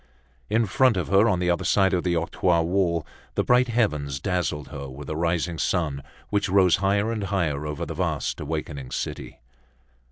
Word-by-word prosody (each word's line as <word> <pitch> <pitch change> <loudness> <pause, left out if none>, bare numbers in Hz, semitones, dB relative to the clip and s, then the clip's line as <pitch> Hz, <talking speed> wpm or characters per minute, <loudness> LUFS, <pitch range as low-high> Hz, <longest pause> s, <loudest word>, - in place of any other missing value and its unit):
In 110 +2 +2
front 125 +2 +3
of 90 - -2
her 100 +4 +5
on 95 - +2
the 90 0 +1
other 85 +2 -1
side 95 +1 +3
of 90 - +1
the 90 -1 +1
octroi 85 +1 +1
wall 85 -2 0 0.3
the - - +1
bright 125 +1 +4
heavens 75 - 0
dazzled 90 -4 -2
her, 70 -1 -7
with 70 +3 -9
the 75 - -4
rising 85 0 -1
sun 75 -6 0 0.3
which 100 -1 +1
rose 95 -2 +4
higher 100 +4 +1
and 110 -3 -2
higher 80 -7 -1
over 75 -1 -4
the - - -5
vast - - -2
awaking 75 -4 -4
city. - - -5
90 Hz, 185 wpm, -25 LUFS, 75-100 Hz, 0.3 s, her